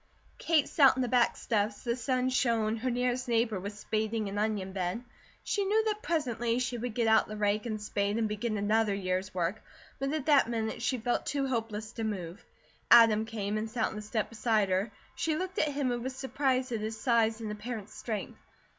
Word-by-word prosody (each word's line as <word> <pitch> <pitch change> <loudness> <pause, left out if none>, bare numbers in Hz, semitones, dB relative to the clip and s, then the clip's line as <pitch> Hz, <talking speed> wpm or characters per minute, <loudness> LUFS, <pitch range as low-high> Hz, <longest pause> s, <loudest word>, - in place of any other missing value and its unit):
Kate 315 -4 +2
sat 275 -4 +5
on 260 - 0
the - - -1
back 245 0 +3
steps, 210 -1 -1
the 235 -1 0
sun 255 +1 0
shone, 230 -3 +1
her 255 +3 -1
nearest 250 +1 0
neighbour 230 -3 +1
was 200 +2 -6
spading 220 0 -1
an 200 +1 -3
onion 205 -3 -1
bed. 190 +5 -2 0.4
She 405 - 0
knew 430 +3 +2
that 425 -1 -1
presently 245 - 0
she 250 -1 -1
would 240 -1 -4
get 235 - +1
out 220 0 +4
the 215 - -6
rake 210 +2 0
and 215 -2 -3
spade 205 0 -1
and 225 -1 +1
begin 215 +1 -2
another 210 0 +2
year's 185 0 -2
work; 180 +3 -2 0.4
but 275 +1 -1
at 305 -3 -2
that 285 -6 +5
minute 225 -1 -2
she 255 +1 0
felt 240 +1 -1
too 280 -1 0
hopeless 225 -4 -3
to 225 - -5
move. 190 -3 -4 0.5
Adam 225 -2 +7
came 215 -2 -2
and 220 +1 -4
sat 225 -1 0
on - - -8
the 210 - -5
step 215 +1 -2
beside 215 -3 +1
her. 190 +4 0 0.2
She 315 -1 -1
looked 370 +3 -3
at 310 - +3
him 275 -3 -1
and 240 0 -2
was 260 +1 -4
surprised 265 -1 0
at 230 - -1
his 220 +1 -4
size 230 -3 +2
and 220 -2 -4
apparent 210 0 -6
strength. 215 -4 -5
225 Hz, 210 wpm, -30 LUFS, 210-250 Hz, 0.5 s, Adam